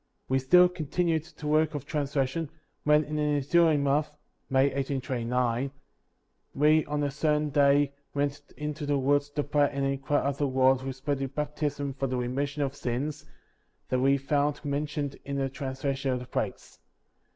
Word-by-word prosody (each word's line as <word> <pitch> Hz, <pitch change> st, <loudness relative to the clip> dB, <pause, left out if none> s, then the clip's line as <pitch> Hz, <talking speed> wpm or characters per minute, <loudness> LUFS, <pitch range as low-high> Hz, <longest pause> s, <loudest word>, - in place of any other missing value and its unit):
68. -, -, -42 dB
We 130 Hz, 0 st, +3 dB
still 180 Hz, +8 st, +6 dB
continued 165 Hz, -1 st, -1 dB
the 160 Hz, -, -12 dB
work 155 Hz, +1 st, +2 dB
of 145 Hz, -1 st, -4 dB
translation, 145 Hz, 0 st, -1 dB, 0.4 s
when, 150 Hz, 0 st, +5 dB
in 150 Hz, 0 st, -4 dB
the -, -, 0 dB
ensuing 150 Hz, +1 st, +3 dB
month 145 Hz, +2 st, +2 dB, 0.4 s
(May, 135 Hz, +1 st, +3 dB
1829), 125 Hz, -2 st, -1 dB, 0.9 s
we 155 Hz, +2 st, +4 dB
on 145 Hz, 0 st, -2 dB
a 145 Hz, -, 0 dB
certain 150 Hz, +1 st, 0 dB
day 140 Hz, 0 st, +4 dB, 0.2 s
went 145 Hz, 0 st, -1 dB, 0.2 s
into 150 Hz, 0 st, -4 dB
the 145 Hz, -1 st, +2 dB
woods 145 Hz, +2 st, +2 dB
to 145 Hz, 0 st, -2 dB
pray 145 Hz, 0 st, +2 dB
and 140 Hz, -1 st, -1 dB
inquire 135 Hz, +1 st, 0 dB
of 140 Hz, 0 st, -1 dB
the 145 Hz, -, +2 dB
Lord 130 Hz, 0 st, +3 dB
respecting 135 Hz, +1 st, -3 dB
baptism 145 Hz, 0 st, -3 dB
for 135 Hz, 0 st, -2 dB
the 130 Hz, 0 st, -2 dB
remission 140 Hz, +4 st, -1 dB
of 140 Hz, 0 st, -3 dB
sins, 140 Hz, +3 st, -3 dB, 0.6 s
that 130 Hz, -, +1 dB
we 135 Hz, +2 st, +4 dB
found 145 Hz, +2 st, 0 dB
mentioned 145 Hz, 0 st, -2 dB
in 140 Hz, -, -4 dB
the 135 Hz, -1 st, 0 dB
translation 135 Hz, +1 st, -3 dB
of 130 Hz, -, +1 dB
the 125 Hz, -, -8 dB
plates. -, -, -4 dB
140 Hz, 165 wpm, -28 LUFS, 135-150 Hz, 0.9 s, still